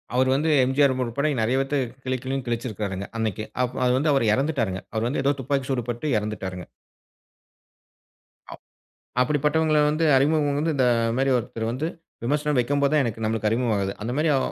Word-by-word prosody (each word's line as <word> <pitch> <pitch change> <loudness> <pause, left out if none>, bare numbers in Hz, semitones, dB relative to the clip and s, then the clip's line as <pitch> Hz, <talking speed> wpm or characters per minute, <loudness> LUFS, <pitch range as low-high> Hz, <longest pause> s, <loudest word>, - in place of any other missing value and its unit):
அவரு 130 +1 +3
வந்து 155 +4 +1
எம்ஜிஆர் 135 +1 +3
உட்பட 140 +6 -1
நெறைய 120 +4 +1
பேர்த்த 135 +1 0 0.3
கிழி 130 0 0
கிழின்னு 135 -1 -3
கிழிச்சிருக்காருங்க 105 -5 -3
அன்னைக்கு. 110 -1 -2 0.2
அப் 125 0 -3
அது 125 - +3
வந்து 150 +3 +2
அவரு 135 -4 +2
இறந்துட்டாருங்க. 125 -9 -1
அவர் 110 +1 0
வந்து 135 +2 -1
ஏதோ 140 +1 +3
துப்பாக்கி 135 0 -1
சூடு 125 -3 0
பட்டு 120 +6 -3
இறந்துட்டாருங்க. 95 -4 -5 1.9
அப் - - -11 0.6
அப்படிப்பட்டவங்கள 150 +3 +2
வந்து, 155 +2 +1
அறிமுகம் 145 0 +2
வந்து 160 +1 0
இந்த 130 - +3 0.3
மாரி 135 +1 +2
ஒருத்தரு 115 -1 -4
வந்து, 145 +6 -2 0.4
விமர்சனம் 150 +3 0
வைக்கும்போது 140 +3 +1
தான் 150 - +4
எனக்கு 115 -2 -3
நம்மளுக்கு 110 0 0
அறிமுகம் 115 +1 +1
ஆகுது. 95 0 -1
அந்த 115 +3 -3
மாரி 155 +1 +2
அ - - +3
130 Hz, 170 wpm, -24 LUFS, 115-145 Hz, 1.9 s, தான்